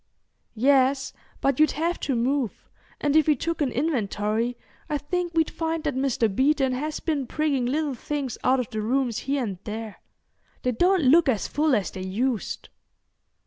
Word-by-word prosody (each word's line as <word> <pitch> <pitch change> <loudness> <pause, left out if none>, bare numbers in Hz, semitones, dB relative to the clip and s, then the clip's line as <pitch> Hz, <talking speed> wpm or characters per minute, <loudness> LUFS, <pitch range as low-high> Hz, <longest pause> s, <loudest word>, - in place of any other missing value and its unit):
"Yes; 265 +2 +3 0.3
but 275 -1 +1
you'd 310 -2 +5
have 335 +3 -1
to 270 - -1
move, 250 0 -1 0.3
and 290 0 +1
if 315 -1 +5
we 305 - +5
took 335 +1 -3
an 275 -4 +1
inventory, 230 -4 -1 0.3
I 300 - +1
think 345 +4 -3
we'd 320 -1 +2
find 325 -1 -2
that 290 - 0
Mr. 260 -3 +1
Beeton 265 +5 +2
has 300 +4 -3
been 290 -6 -1
prigging 285 -4 0
little 295 +2 0
things 270 0 -3
out 260 +1 +3
of 250 0 -3
the 215 -2 -2
rooms 240 0 0
here 280 -2 +1
and 195 -6 -4
there. 220 -1 -6 0.7
They 250 - +2
don't 355 +8 +3
look 290 +3 +5
as 220 -6 0
full 300 -2 +2
as 205 -4 -1
they 190 - -7
used." 220 +5 -2
270 Hz, 175 wpm, -25 LUFS, 235-305 Hz, 0.7 s, you'd